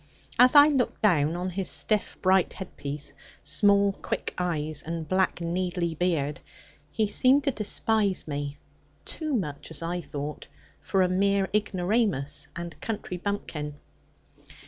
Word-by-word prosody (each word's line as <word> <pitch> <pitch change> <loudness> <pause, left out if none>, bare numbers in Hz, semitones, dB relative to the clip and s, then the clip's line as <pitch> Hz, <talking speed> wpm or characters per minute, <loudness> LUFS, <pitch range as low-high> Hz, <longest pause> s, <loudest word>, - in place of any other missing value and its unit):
As 250 +3 +7
I 290 0 +10
looked 265 -7 -1
down 160 -6 +3
on 180 +1 -3
his 190 0 -1
stiff 215 -2 +1
bright 190 -1 +3
head 190 - -9
piece, 145 +1 -3 0.3
small 200 -1 +4
quick - - -4
eyes 155 -4 -2
and 165 -1 -5
black 185 +2 +1
needly 175 0 -1
beard, 150 -4 0 0.5
he 220 - 0
seemed 255 +7 +4
to 275 - +1
despise 210 -3 0
me 145 -1 -4 0.5
(too 310 -4 -3
much, 150 -10 -4
as 160 - -4
I 175 +1 -2
thought) 145 0 -6 0.3
for 190 -1 +1
a - - +3
mere 195 +1 +1
ignoramus 185 - 0
and 170 0 -7
country 210 -4 -4
bumpkin. 170 -6 -4
185 Hz, 140 wpm, -27 LUFS, 155-205 Hz, 0.5 s, I